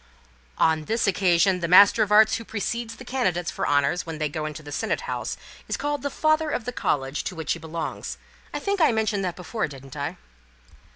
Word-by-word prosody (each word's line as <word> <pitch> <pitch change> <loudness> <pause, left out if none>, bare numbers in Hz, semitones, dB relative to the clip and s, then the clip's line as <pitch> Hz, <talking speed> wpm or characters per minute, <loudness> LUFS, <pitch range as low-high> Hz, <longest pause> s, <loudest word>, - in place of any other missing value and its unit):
"Oh, - - +2
on 160 -1 +2
this 225 +6 0
occasion 185 -1 +3
the 170 - -1
Master 195 +4 +7
of 210 - +1
Arts 215 +1 +6
who 230 - -7
precedes 230 +2 -3
the 250 - -11
candidates 185 -10 -1
for - - -2
honours 145 +5 +2
when 165 -1 -6
they 155 -1 -1
go 155 +1 -3
into 155 0 -7
the 145 - -9
Senate - - -1
House - - -4 0.3
is - - -2
called 290 0 -2
the 285 - -2
Father 310 +1 +1
of 245 - -2
the 250 - -4
College 135 - -1
to 185 - -4
which 160 -3 -1
he 165 - -7
belongs. 160 0 -5 0.3
I - - -3
think 400 -2 -1
I 315 - +6
mentioned 220 -3 0
that 180 -2 -2
before, 185 +5 -3
didn't 135 -2 -11
I?" 145 -1 -4
185 Hz, 220 wpm, -25 LUFS, 155-230 Hz, 0.3 s, Master